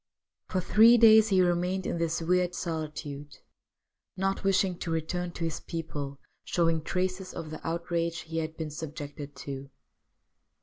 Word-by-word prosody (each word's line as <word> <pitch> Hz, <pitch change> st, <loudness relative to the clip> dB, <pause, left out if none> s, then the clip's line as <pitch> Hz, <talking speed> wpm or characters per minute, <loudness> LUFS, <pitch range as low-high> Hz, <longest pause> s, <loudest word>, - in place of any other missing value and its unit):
For 185 Hz, -, -1 dB
three 225 Hz, +6 st, +7 dB
days 220 Hz, -1 st, +8 dB
he 190 Hz, -3 st, +4 dB
remained 180 Hz, +2 st, 0 dB
in 170 Hz, -, -2 dB
this 165 Hz, 0 st, -1 dB
weird 180 Hz, +1 st, +2 dB
solitude, 150 Hz, -4 st, -5 dB, 0.8 s
not 195 Hz, +1 st, -1 dB
wishing 190 Hz, -2 st, +2 dB
to -, -, -4 dB
return 175 Hz, +2 st, -2 dB
to 170 Hz, -, -5 dB
his 165 Hz, -3 st, -2 dB
people 145 Hz, -4 st, -5 dB, 0.2 s
showing 165 Hz, -2 st, +1 dB
traces 185 Hz, +2 st, -2 dB
of 155 Hz, -1 st, -6 dB
the 155 Hz, -, -7 dB
outrage 170 Hz, 0 st, -2 dB
he 165 Hz, 0 st, -4 dB
had 160 Hz, 0 st, -4 dB
been 155 Hz, -2 st, -4 dB
subjected 145 Hz, -2 st, -7 dB
to. 140 Hz, 0 st, -7 dB
165 Hz, 145 wpm, -29 LUFS, 155-180 Hz, 0.8 s, days